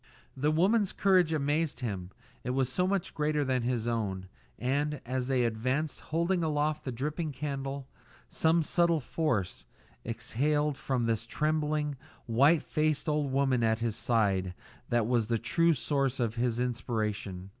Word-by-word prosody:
The 145 +3 +1
woman's 190 +6 +3
courage 185 -4 +3
amazed 150 0 0
him; 95 -7 -3 0.3
it - - -4
was 130 0 +1
so 180 +7 +1
much 195 -2 -1
greater 150 -1 0
than 130 -1 +1
his 120 -1 -1
own; 100 -5 -2 0.3
and, 145 +3 0
as 125 0 -2
they 130 -2 +2
advanced, 130 +7 -1
holding 170 +3 0
aloft 155 0 0
the 130 - -2
dripping 150 +6 -3
candle, 140 -1 -4 0.4
some 165 +1 +2
subtle 170 +1 +2
force 125 - -1 0.4
exhaled 145 +6 0
from 130 -3 -1
this 115 0 -1
trembling, 150 0 0 0.3
white 140 +7 +4
faced 155 +1 0
old 150 -2 0
woman 135 -2 +2
at 110 0 +3
his 115 -2 -1
side 100 -7 +1 0.3
that 120 -2 +2
was 115 -2 +1
the 115 0 +1
true 165 +9 +2
source 135 -1 0
of 115 -3 0
his 120 0 0
inspiration. 110 -6 -2
135 Hz, 150 wpm, -30 LUFS, 115-155 Hz, 0.4 s, white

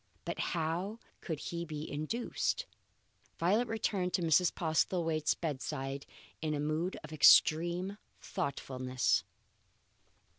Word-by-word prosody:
But - - -4 0.2
how 170 +7 -1 0.2
could 160 -4 -4
he 170 +2 -4
be 155 -2 -5
induced? 230 - -2 0.7
Violet 210 +8 +2
returned 200 -5 -1
to 180 - 0
Mrs. 165 +2 +4
Postlethwaite's 160 -1 +1
bedside 140 -3 -4 0.3
in 155 -1 -1
a - - -2
mood 155 +5 -1
of 155 +1 -9
extreme 175 +6 +5 0.2
thoughtfulness. 130 -6 -1
160 Hz, 105 wpm, -33 LUFS, 150-180 Hz, 0.7 s, extreme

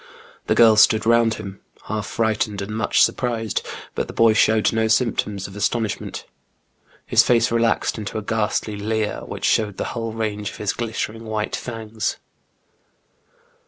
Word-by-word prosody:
The - - +2
girls 110 -2 +7
stood 110 0 +4
round 115 -1 +4
him, 100 -2 -9 0.2
half 110 0 -4
frightened 110 -2 -1
and 105 +2 -5
much 110 - +3
surprised, 115 -4 -1 0.3
but - - -2
the - - -9
boy 115 -1 +5
showed 110 0 +3
no 110 0 +1
symptoms 110 -4 0
of 95 - -9
astonish 110 +1 -1
ment. - - -7 0.8
His - - +5
face 115 -1 +3
relaxed 115 -1 +1
into 105 0 -5
a 110 - -4
ghastly 105 0 -1
leer, 110 +1 -2
which - - -5
showed 105 -3 +1
the - - -2
whole 115 -1 -3
range 105 -2 -3
of - - -11
his 105 -2 -1
glittering 115 -1 -4
white 110 -1 -2
fangs. 115 -2 -4
110 Hz, 160 wpm, -22 LUFS, 105-115 Hz, 0.8 s, girls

